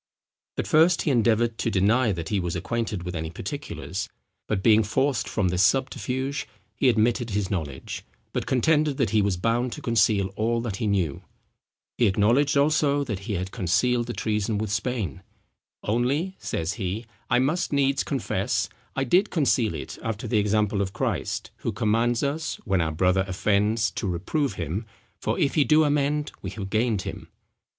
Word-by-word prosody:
At - - -1
first 165 +3 +4
he 150 - +1
endeavoured 115 -1 +2
to - - 0
deny 110 +4 +3
that 85 -3 -4
he 105 - +1
was 90 -2 -2
acquainted 105 +1 -2
with 90 0 -5
any 80 0 -3
particulars; 95 - -5 0.4
but 95 -3 -1
being 110 -1 +6
forced 130 +5 0
from 100 -4 +1
this 90 +1 +1
subterfuge, 130 +4 0 0.3
he 130 - +3
admitted 120 +1 +2
his 100 -2 -1
knowledge, 75 -8 -4 0.3
but - - -2
contended 150 +2 +2
that 115 -7 +1
he 110 -1 +4
was 100 -3 +1
bound 115 +6 0
to 150 - -8
conceal 105 -4 +2
all 115 +2 +1
that 110 -5 -3
he 110 - -1
knew. 90 -8 0 0.8
He 120 - +5
acknowledged 120 +9 +3
also 145 0 +3
that 110 -8 -4
he 105 +2 -5
had 95 0 -3
concealed 120 +7 +1
the 120 - -3
treason 105 -1 -1
with 105 -1 -2
Spain. 105 - -2 0.6
"Only," 135 - 0
says 80 +3 -2
he, 100 +5 -2 0.2
"I 125 - +4
must 145 +8 +1
needs 140 -1 +2
confess, 135 -5 -1 0.3
I 135 - +1
did 180 - +3
conceal 130 - +1
it 75 - -7
after 110 -2 -3
the 110 - +2
example 105 0 +1
of 95 -1 -2
Christ, - - -2
who - - -3
commands 115 +3 +1
us, 150 +3 -1
when 95 -4 +2
our 80 -1 0
brother 90 +4 +2
offends 105 +4 +1
to 100 - -3
reprove 100 - -1
him, 90 +6 -4 0.3
for - - -1
if 140 - +1
he 150 - +4
do 155 +2 +5
amend 145 0 +1
we - - -4
have 100 -3 -6
gained 110 -3 +1
him." - - -7
110 Hz, 175 wpm, -25 LUFS, 100-135 Hz, 0.8 s, being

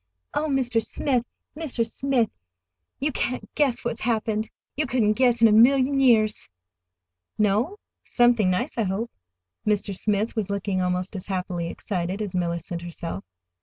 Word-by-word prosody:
"Oh, 310 - 0
Mr. 250 -5 +1
Smith, 255 -5 0 0.3
Mr. 290 -7 -1
Smith, 255 -2 0 0.7
you 295 +3 0
can't 255 -1 -2
guess 270 -6 +1
what's 235 - -2
happened! 220 -1 0 0.3
You 300 0 0
couldn't 230 -4 +2
guess 240 0 +3
in - - +10
a - - +4
million 260 +5 +5
years!" 220 -5 +3 0.9
"No? 215 - +1 0.2
Something 240 -5 +3
nice, 235 +8 -1
I - - +3
hope." 200 +5 -2 0.5
Mr. 205 -1 0
Smith 210 +3 0
was 210 -3 -1
looking 200 -1 -1
almost 180 +2 -1
as 185 - -6
happily 180 -3 -2
excited 180 +1 -3
as 205 -3 -3
Mellicent 170 -1 -2
herself. 170 - -6
220 Hz, 145 wpm, -25 LUFS, 190-245 Hz, 0.9 s, in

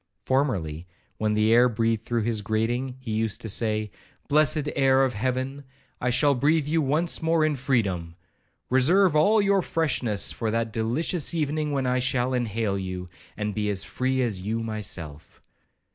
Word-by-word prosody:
Formerly, 90 - -1 0.3
when 105 -1 +1
the 110 +1 +3
air 120 +2 +6
breathed 115 -1 0
through 115 0 -1
his 110 -1 -1
grating, 120 +5 -1
he 130 -4 -6
used 110 -1 -1
to - - -5
say, 110 0 -1 0.4
'Blessed 150 0 +2
air 135 -1 +4
of 130 - -2
heaven, 130 +5 -2 0.4
I 125 - +1
shall 135 +4 +3
breathe 145 +4 +2
you 160 +1 +1
once 155 +4 0
more 160 -1 +2
in 155 -1 +1
freedom!—Reserve 125 - 0
all 205 +8 +4
your 200 -1 +3
freshness 130 - 0
for 115 - -3
that 115 0 -1
delicious 145 +10 -1
evening 150 -1 -1
when 135 -2 -1
I 125 0 +1
shall 125 0 0
inhale 110 -4 -1
you, 90 -1 -5 0.3
and 105 0 -2
be 105 0 -1
as 100 -1 -2
free 130 0 -1
as 105 -6 -2
you 110 +4 -2
myself.' 90 -9 -5
125 Hz, 160 wpm, -25 LUFS, 110-140 Hz, 0.4 s, air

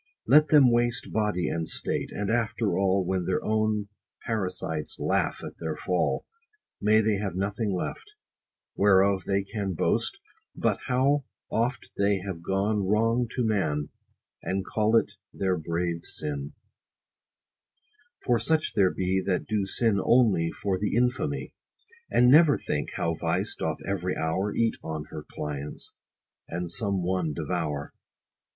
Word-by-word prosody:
Let 150 +1 +6
them 145 -4 +6
waste 120 0 0
body 105 -6 0
and 80 +1 -2
state; - - -2
and 100 +1 -2
after 115 -2 0
all, 95 -1 +2
When 95 -1 -1
their 95 - -1
own 110 -1 0 0.4
parasites 90 -8 -3
laugh - - 0
at - - -8
their 80 -2 -3
fall, 90 +2 0 0.6
May 110 +1 +5
they 110 -2 +1
have 100 -3 -3
nothing 100 +3 -1
left, 95 - -4 0.6
whereof 95 -1 +4
they 100 0 +1
can 100 -2 -3
Boast, - - 0 0.4
but - - 0
how 135 +2 +2 0.3
oft 120 +3 -1
they 100 0 +3
have 95 -4 -5
gone 100 +3 0
wrong 115 +4 +2
to 125 - +1
man, 80 -9 0 0.5
And 95 +1 -2
call 110 +1 +1
it - - +1 0.2
their 95 -1 0
brave 85 +1 -2
sin: 75 -2 -3 1.7
for 120 -2 +3
such 155 +7 +1
there 95 -2 +4
be 95 +1 0
That 95 -1 -1
do 105 -3 -1
sin 110 0 +1
only 105 -10 +4
for 95 +2 -2
the 105 +1 -1
infamy; 125 +5 0 0.6
And 125 +1 +5
never 150 0 +7
think, 75 - -3
how 85 - -1
vice - - -1
doth - - -3
every - - -1
hour 95 +6 -1
Eat 115 +1 +1
on 80 -1 -4
her - - -6
clients, 75 -1 -6 0.6
and 85 0 -3
some 100 -5 +1
one 90 -4 -1
devour. 70 0 -3
100 Hz, 145 wpm, -27 LUFS, 90-115 Hz, 1.7 s, never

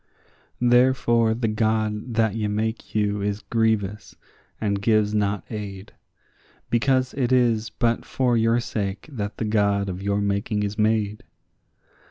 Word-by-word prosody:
Therefore 120 -2 +3
the 115 0 -1
God 110 +1 -1
that 110 -3 +2
ye 110 -1 -1
make 110 +3 -3
you 105 -1 +1
is 100 +1 -2
grievous, 110 -3 0 0.4
and 100 -2 -1
gives 105 -1 +2
not 105 -3 0
aid, 100 -3 -6 0.8
Because 130 +2 +2
it 130 -2 -1
is 115 -3 +2
but 115 +2 0
for 125 -2 0
your 115 +1 +3
sake 100 -2 -4
that 105 -6 -5
the 115 - -2
God 100 -2 +1
of 90 0 -5
your 100 +1 0
making 100 +1 -1
is 100 0 -2
made. 110 -1 0
110 Hz, 140 wpm, -24 LUFS, 105-115 Hz, 0.8 s, Therefore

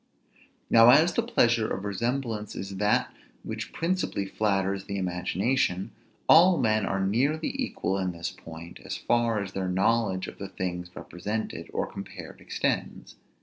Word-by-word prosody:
Now 115 +1 +7
as 155 +7 +6
the - - +2
pleasure 120 - +2
of 95 +2 -3
resemblance 115 +1 -2
is 95 0 -6
that 105 +1 +1 0.3
which - - -5
principally 170 - -1
flatters 100 -1 0
the 100 -1 -4
imagination, 95 +3 0 0.4
all 175 +2 +7
men 110 -2 +2
are 95 0 0
nearly 140 +10 +1
equal 245 - -1
in 95 -1 -1
this 85 0 -4
point, 85 +1 -11
as - - -4
far 115 -3 +1
as 95 - -7
their 95 -1 -2
knowledge 95 0 +1
of - - -10
the 100 - -6
things 90 -2 -4
represented 100 -2 -5
or - - -1
compared - - -9
extends. - - -2
100 Hz, 145 wpm, -27 LUFS, 95-120 Hz, 0.4 s, Now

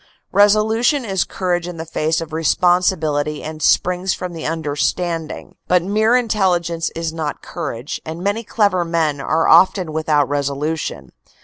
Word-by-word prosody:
Reso 205 +2 +5
lution 240 +4 +1
is 190 -2 0
courage 175 -2 -2
in 175 -1 -7
the 160 - -5
face 160 0 -1
of 160 -1 -8
responsibility 160 -3 +1
and 155 0 -7
springs 180 +4 +2
from 180 -1 -6
the 165 - -5
understanding, 160 +1 -3
but 180 -1 +3
mere 215 +5 +2
intelligence 180 -8 0
is 165 -1 -3
not 155 -3 -4
courage, 120 +6 -5
and 160 +3 -7
many 205 +4 -1
clever 200 -5 +1
men 160 -4 -1
are 160 +3 +1
often 185 -3 +4
without 155 -2 +1
resolution. 140 - -3
165 Hz, 145 wpm, -19 LUFS, 155-190 Hz, -, Reso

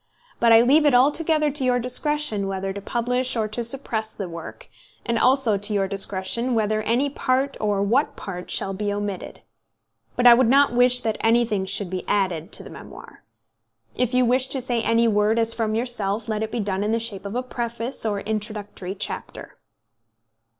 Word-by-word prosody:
But 235 -1 +4
I 225 0 +8
leave 295 +5 +4
it 275 - +4
altogether 300 +3 +2
to 275 -1 -1
your 250 -1 +2
discretion 250 -3 -1
whether 195 0 -3
to 200 - -7
publish 250 +4 -1
or 220 -1 0
to 235 +3 -3
suppress 225 -3 -2
the 195 - -5
work; 170 -1 -9 0.4
and 235 -2 0
also 250 -6 +3
to 205 +2 +2
your 195 -1 +1
discretion 200 +5 +1
whether 215 -1 0
any 240 +6 +1
part 270 0 -1
or 205 -2 0
what 245 +9 +1
part 180 -2 -8
shall 195 - -2
be 205 +1 -3
omitted. 205 -2 -5 0.7
But 245 - 0
I 240 - +10
would 240 -1 +3
not 275 0 +4
wish 250 0 +5
that 220 -2 -2
anything 225 -4 +1
should 195 -1 -1
be 185 -1 -4
added 185 -6 -1
to - - -5
the - - -11
memoir. - - -13 0.7
If 250 0 -1
you 255 0 +3
wish 255 +2 +2
to 270 - 0
say 245 -2 -1
any 230 +1 +2
word 210 +1 +2
as 230 0 +2
from 220 -2 -2
yourself, 225 -3 -2
let 215 -1 -2
it 220 - -2
be 240 - -3
done 195 -1 -2
in 210 - -1
the 230 - +1
shape 215 -4 -4
of 200 - -7
a 250 - -1
preface 235 0 -4
or 205 -3 -1
introductory 210 -3 -5
chapter." - - -5
225 Hz, 190 wpm, -23 LUFS, 205-250 Hz, 0.7 s, I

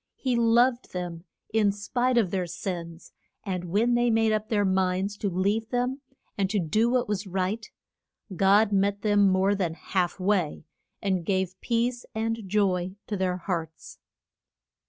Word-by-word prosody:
He 255 -2 -1
loved 235 +2 +3
them 175 -1 -5 0.3
in 215 -2 +3
spite 245 +5 0
of 205 -7 +2
their 185 -2 -1
sins, 170 -1 -6 0.3
and 185 -3 -3
when 215 +8 +2
they 240 0 +3
made 225 -1 +3
up 215 0 -1
their 205 -2 +2
minds 190 +1 0
to 200 - -1
leave 200 +5 0
them, 250 +2 -1 0.3
and 195 -2 0
to 210 - 0
do 215 +7 +2
what 250 0 +1
was 205 -1 -2
right, 190 +4 -2 0.7
God 200 +4 +4
met 200 0 +1
them 205 -2 +4
more 190 +2 +3
than 180 -5 -1
half 180 +1 -2
way, 185 -6 0 0.4
and 190 -3 0
gave 190 0 0
peace 240 +1 0
and 225 +1 -1
joy 185 -2 +1
to 210 - -3
their 185 -2 0
hearts. 165 -3 -5
200 Hz, 155 wpm, -27 LUFS, 185-225 Hz, 0.7 s, God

